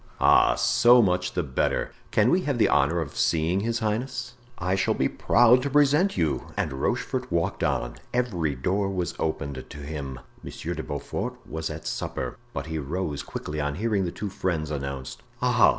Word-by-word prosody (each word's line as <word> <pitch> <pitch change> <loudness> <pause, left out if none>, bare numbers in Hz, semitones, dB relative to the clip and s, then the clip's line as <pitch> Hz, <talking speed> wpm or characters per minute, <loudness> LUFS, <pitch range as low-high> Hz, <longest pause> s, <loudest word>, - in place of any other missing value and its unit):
"Ah! - - +5
so 120 +1 +5
much 90 -4 +2
the 90 - 0
better! 65 -3 0 0.2
Can 110 +4 +3
we 185 - +3
have 145 -6 -1
the 110 - +4
honor 75 +4 +3
of 75 - -6
seeing 80 +9 +2
his 115 +3 -1
highness?" 120 +3 -2 0.2
"I 90 +1 -1
shall 95 - +1
be - - +2
proud 120 +1 +4
to 140 - -1
present 150 +7 +3
you," 80 -3 0
and 75 - -1
Rochefort 125 - -2
walked 85 -1 0
on. - - -1
Every 90 - 0
door 95 +9 0
was 90 -3 -2
opened 70 -4 -2
to - - -9
him. 70 -3 -6 0.2
Monsieur - - -5
de - - -4
Beaufort 70 -1 -4
was 80 0 -4
at 80 0 -7
supper, - - -3 0.2
but 70 - -4
he 80 0 -3
rose 75 0 -3
quickly 75 0 -5
on 70 0 -1
hearing 105 -1 0
the 85 - -2
two 105 +1 -5
friends 80 -6 -2
announced. 70 -3 -5 0.2
"Ah!" - - +5
85 Hz, 180 wpm, -26 LUFS, 75-115 Hz, 0.2 s, Ah